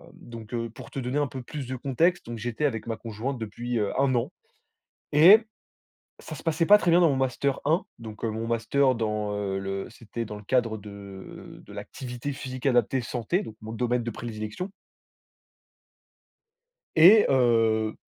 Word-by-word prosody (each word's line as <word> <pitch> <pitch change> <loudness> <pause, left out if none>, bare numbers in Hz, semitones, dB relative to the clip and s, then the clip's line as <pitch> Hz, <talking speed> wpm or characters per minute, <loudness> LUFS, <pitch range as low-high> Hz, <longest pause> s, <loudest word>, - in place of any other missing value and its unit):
donc 115 -1 -11
heu, 115 -1 -2
pour 115 - -12
te - - -5
donner 130 +3 -1
un 145 - +1
peu 130 -1 -7
plus 140 +1 -6
de 130 - -4
contexte, 140 +8 +1
donc 120 0 -6
j'étais 120 +5 -2
avec 115 -5 -2
ma 115 - -3
conjointe 115 +4 -4
depuis, 120 +2 -4
heu, 105 -2 0
1 135 -1 +3
an, 120 - 0 0.8
et 175 +9 +9 0.8
ça - - -9
se - - -10
passait 165 0 +1
pas 205 +4 +8
très 175 - +1
bien 170 - +6
dans 170 -2 +5
mon 140 - +1
Master 130 +1 0
1. 160 +5 +2
Donc 110 -2 -10
heu, - - 0
mon 110 +1 -4
master 130 +4 +2
dans, 105 -2 -2
heu, 100 -1 -2
le 95 0 -4
c'était 115 +1 -6
dans 105 - -7
le 105 - -9
cadre 115 0 +1
de 100 -2 -11
de - - -13
l'activité 125 +2 -6
physique 130 0 -7
adaptée 130 0 +2
santé, 120 - -1
donc 110 - -9
mon 110 +1 -7
domaine 120 +1 0
de 120 - -3
prédilection. 110 - -6 2.3
Et 200 +7 +8
heu, 115 -4 +3
120 Hz, 180 wpm, -26 LUFS, 110-135 Hz, 2.3 s, et